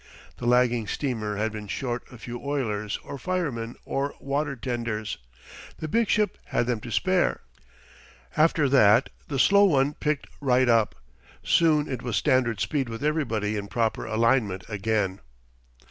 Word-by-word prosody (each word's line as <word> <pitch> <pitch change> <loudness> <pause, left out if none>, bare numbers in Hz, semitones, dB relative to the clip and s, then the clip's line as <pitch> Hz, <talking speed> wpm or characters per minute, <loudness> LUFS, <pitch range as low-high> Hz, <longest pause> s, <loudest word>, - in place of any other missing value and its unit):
The 120 - -4
lagging 120 -2 +3
steamer 110 -5 -2
had 110 +2 0
been 105 -1 -7
short 120 +1 -3
a 125 - -11
few 120 +2 -7
oilers 110 -8 -2
or 140 - -7
firemen 140 -11 -2
or 140 +1 -2
water 140 +1 -2
tenders. 115 -4 -3 0.6
The 155 - -5
big 230 +7 +1
ship 210 0 +1
had - - 0
them 120 -2 -1
to 120 +2 -8
spare. 185 - +1 0.9
After 155 -1 +3
that 125 -3 +5 0.2
the 140 - -3
slow 200 +9 +6
one 145 -5 +3
picked 150 -1 -2
right 130 -2 +3
up. 115 -9 +3 0.5
Soon 150 - +3
it 130 -3 -4
was 120 -4 -3
standard 120 -4 +2
speed 135 +1 -1
with 115 +3 -6
everybody 115 -9 0
in 100 -1 -4
proper 110 +2 -1
alignment 110 -4 +1
again. 100 -2 -1
125 Hz, 150 wpm, -26 LUFS, 110-145 Hz, 0.9 s, slow